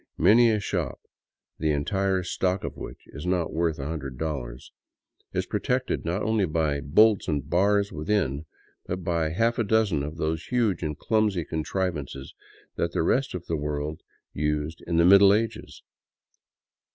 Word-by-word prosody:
Many 120 Hz, +2 st, +6 dB
a 110 Hz, -1 st, +2 dB
shop, 90 Hz, -8 st, -3 dB, 0.6 s
the 80 Hz, -, 0 dB
entire 95 Hz, +6 st, 0 dB
stock 90 Hz, +2 st, -1 dB
of -, -, -5 dB
which -, -, -9 dB
is 75 Hz, +5 st, -7 dB
not 90 Hz, -2 st, 0 dB
worth 80 Hz, -1 st, 0 dB
a 70 Hz, -, -5 dB
hundred 70 Hz, -5 st, -5 dB
dollars, 65 Hz, -6 st, -5 dB, 0.6 s
is -, -, -1 dB
pro -, -, -2 dB
tected 125 Hz, 0 st, -1 dB
not 90 Hz, +5 st, -1 dB
only 110 Hz, -2 st, +2 dB
by 75 Hz, -3 st, 0 dB
bolts 100 Hz, +9 st, +4 dB
and 70 Hz, -2 st, -1 dB
bars 100 Hz, +4 st, +2 dB
within, 80 Hz, -3 st, -1 dB, 0.4 s
but 90 Hz, 0 st, -4 dB
by 85 Hz, -2 st, 0 dB
half 115 Hz, +8 st, +1 dB
a -, -, +3 dB
dozen 105 Hz, -7 st, +2 dB
of 75 Hz, +3 st, -5 dB
those 80 Hz, 0 st, -2 dB
huge 115 Hz, -8 st, +1 dB
and 75 Hz, -3 st, -3 dB
clumsy 105 Hz, -6 st, +1 dB
contrivances 80 Hz, -5 st, -3 dB, 0.4 s
that -, -, -1 dB
the -, -, +1 dB
rest 130 Hz, +8 st, +1 dB
of 90 Hz, -, -6 dB
the 85 Hz, -, -2 dB
world 75 Hz, +1 st, -3 dB, 0.3 s
used 75 Hz, +2 st, -2 dB
in 85 Hz, -, 0 dB
the 85 Hz, -, +5 dB
Middle 100 Hz, +2 st, +7 dB
Ages. 115 Hz, 0 st, -4 dB
85 Hz, 165 wpm, -26 LUFS, 75-100 Hz, 0.6 s, Middle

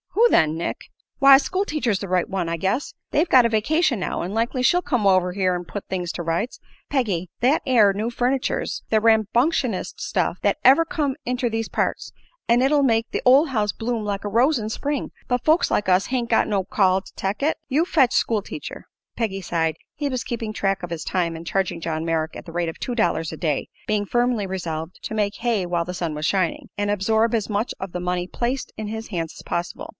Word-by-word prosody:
"Who 470 Hz, +3 st, +5 dB
then, 155 Hz, -1 st, +2 dB
Nick?" 170 Hz, -, -3 dB, 0.4 s
"Why, 275 Hz, -1 st, +9 dB
school 370 Hz, +8 st, -1 dB
teacher's 255 Hz, -, -1 dB
the 200 Hz, -, -5 dB
right 180 Hz, -1 st, +1 dB
one, 190 Hz, -4 st, -2 dB
I 165 Hz, -, -1 dB
guess. 195 Hz, -, -1 dB, 0.2 s
They've 315 Hz, +5 st, +2 dB
got 255 Hz, -2 st, +6 dB
a -, -, +3 dB
vacation 245 Hz, -, +1 dB
now, 180 Hz, -, -2 dB
an' 180 Hz, +3 st, -4 dB
likely 235 Hz, +3 st, 0 dB
she'll 355 Hz, +7 st, +4 dB
come 250 Hz, -, -1 dB
over 185 Hz, -2 st, +3 dB
here 185 Hz, -1 st, +1 dB
an' 175 Hz, 0 st, -5 dB
put 205 Hz, +3 st, -6 dB
things 180 Hz, -2 st, -2 dB
to 175 Hz, -, -4 dB
rights. 170 Hz, +9 st, -2 dB, 0.3 s
Peggy, 200 Hz, -, -1 dB
that 265 Hz, +6 st, +3 dB
air 225 Hz, -6 st, +5 dB
new 210 Hz, +4 st, -2 dB
furniture's 250 Hz, +2 st, -1 dB
the 220 Hz, -1 st, +3 dB
rambunctionest 225 Hz, -, +1 dB
stuff 180 Hz, -1 st, -1 dB
thet 200 Hz, -, +2 dB
ever 275 Hz, +6 st, +6 dB
come 290 Hz, -4 st, -2 dB
inter 250 Hz, 0 st, 0 dB
these 225 Hz, 0 st, -2 dB
parts, -, -, -2 dB, 0.3 s
an' 235 Hz, +1 st, +4 dB
it'll 285 Hz, +2 st, +3 dB
make 230 Hz, -4 st, +1 dB
the -, -, -2 dB
ol' 270 Hz, +5 st, +6 dB
house 215 Hz, -6 st, 0 dB
bloom 225 Hz, -1 st, -3 dB
like 200 Hz, -1 st, -3 dB
a 205 Hz, -, -3 dB
rose 255 Hz, +8 st, +3 dB
in 215 Hz, -2 st, -4 dB
Spring. 285 Hz, +4 st, -3 dB, 0.2 s
But 245 Hz, -1 st, 0 dB
folks 315 Hz, +3 st, +3 dB
like 205 Hz, -, 0 dB
us 185 Hz, +1 st, +3 dB
hain't 250 Hz, -2 st, -1 dB
got 225 Hz, -, +3 dB
no 200 Hz, -3 st, 0 dB
call 190 Hz, 0 st, +2 dB
to -, -, -16 dB
tech 195 Hz, +6 st, -3 dB
it. 310 Hz, -, +1 dB
You 290 Hz, +4 st, +2 dB
fetch 275 Hz, -8 st, +3 dB
school 220 Hz, -3 st, +1 dB
teacher." 290 Hz, -, -8 dB, 0.3 s
Peggy 200 Hz, -4 st, -2 dB
sighed. 165 Hz, -3 st, -1 dB, 0.2 s
He 290 Hz, 0 st, -2 dB
was 255 Hz, -2 st, -2 dB
keeping 230 Hz, -3 st, -4 dB
track 195 Hz, -2 st, 0 dB
of 175 Hz, -, -6 dB
his 165 Hz, -2 st, -4 dB
time 170 Hz, -3 st, -1 dB
and 165 Hz, +1 st, -8 dB
charging 175 Hz, 0 st, -1 dB
John 160 Hz, -1 st, -3 dB
Merrick 160 Hz, -1 st, -1 dB
at -, -, -10 dB
the 165 Hz, -, -10 dB
rate 175 Hz, -1 st, -1 dB
of 165 Hz, -, -9 dB
two 245 Hz, -, -3 dB
dollars 165 Hz, -8 st, 0 dB
a -, -, -7 dB
day, 150 Hz, -5 st, -1 dB, 0.2 s
being 210 Hz, -1 st, 0 dB
firmly 240 Hz, -2 st, +1 dB
resolved 165 Hz, -3 st, -5 dB
to -, -, -5 dB
"make 210 Hz, -1 st, 0 dB
hay 230 Hz, -5 st, 0 dB
while 175 Hz, -1 st, 0 dB
the 180 Hz, -, -5 dB
sun 170 Hz, -4 st, -3 dB
was 150 Hz, +1 st, -3 dB
shining" 185 Hz, -2 st, 0 dB
and 205 Hz, 0 st, -1 dB
absorb 220 Hz, +3 st, +2 dB
as 220 Hz, -2 st, -1 dB
much 210 Hz, +3 st, -1 dB
of 190 Hz, -1 st, -5 dB
the 180 Hz, -, -4 dB
money 180 Hz, 0 st, -2 dB
placed 245 Hz, +6 st, -3 dB
in 215 Hz, -, -4 dB
his 220 Hz, +1 st, -6 dB
hands 165 Hz, -5 st, -4 dB
as -, -, -11 dB
possible. 240 Hz, -, -4 dB
210 Hz, 225 wpm, -23 LUFS, 180-250 Hz, 0.4 s, Why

